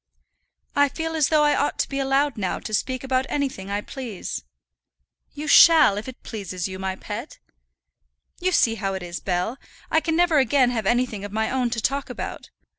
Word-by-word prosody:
"I 285 0 +4
feel 325 +3 -4
as 310 -3 +2
though 305 -1 +4
I 295 -1 +4
ought 290 - 0
to - - 0
be 275 - -3
allowed 275 0 +1
now 190 -4 -2
to 215 - -7
speak 255 +4 -1
about 260 0 0
anything 265 -9 -2
I 205 +1 -1
please." 235 -6 -6 0.9
"You 300 +1 -6
shall, 315 -7 +7
if 210 +4 -5
it 260 - -10
pleases 185 -5 -5
you, 185 0 -7
my 190 0 -2
pet." 220 +8 -7 1.0
"You 370 +1 0
see 235 -9 +3
how 195 -1 -1
it 190 - -5
is, 175 0 -5
Bell; 185 +7 -2 0.3
I 320 - +5
can 320 0 -1
never 340 -3 +4
again 265 -2 +3
have 225 -5 -2
anything 240 -4 0
of 205 - -6
my 220 +1 -1
own 255 -2 0
to 235 -1 -2
talk 275 +4 -1
about." - - -6
255 Hz, 195 wpm, -24 LUFS, 205-285 Hz, 1.0 s, shall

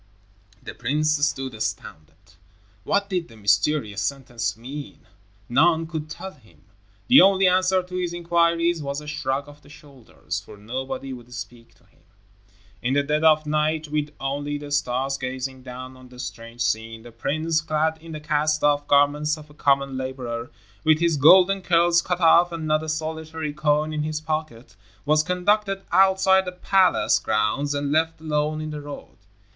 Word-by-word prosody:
The - - -8
prince 150 +3 0
stood 135 -3 -1
astounded. 80 -9 -7 0.5
What 200 0 +1
did 180 -4 -2
the 115 - -16
mysterious 105 +2 +1
sentence 120 0 -3
mean? 140 +5 -9 0.4
None 160 +6 +3
could 160 -2 -6
tell 190 +5 -7
him. 110 - -23 0.4
The 265 +3 +8
only 195 0 +5
answer 185 0 +3
to 180 0 -9
his 180 -2 -2
inquiries 170 -1 +1
was 140 0 -3
a 150 - -11
shrug 145 -2 -3
of 145 0 -15
the 145 - -19
shoulders, 140 -5 -8
for - - -14
nobody 130 +5 -5
would 125 -1 -12
speak 120 -2 -10
to - - -29
him. - - -30 0.8
In 130 +3 0
the 145 - +3
dead 150 +2 0
of 155 -1 +5
night, 155 +1 0
with 150 0 -1
only 145 +2 -3
the 145 0 -9
stars 135 -1 -1
gazing 130 0 -5
down 130 0 -9
on 130 -1 -15
the 125 - -15
strange 115 -1 -8
scene, 110 0 -2
the 120 - -12
prince, 155 +7 -1
clad 160 0 -1
in 165 0 -11
the 155 - -5
cast 150 0 0
off 145 0 +2
garments 145 +2 +3
of 150 -1 -13
a - - -16
common 140 -2 +1
laborer, 125 -3 -5 0.3
with 155 0 +4
his 170 -1 +2
golden 185 +7 +6
curls 170 -1 +3
cut 180 +1 -2
off 170 +1 +5
and 165 -2 -5
not 155 0 +1
a 160 - -5
solitary 160 0 -4
coin 150 +1 +1
in 150 - -2
his 155 0 -2
pocket, 155 -6 -5 0.3
was 155 +1 +4
conducted 195 +3 0
outside 190 +1 +4
the 180 - -4
palace 185 +1 +3
grounds 140 +7 0
and 145 0 -2
left 160 +1 +1
alone 155 0 -1
in 155 0 -5
the 150 -1 -6
road. 145 0 -10
150 Hz, 175 wpm, -23 LUFS, 130-160 Hz, 0.8 s, The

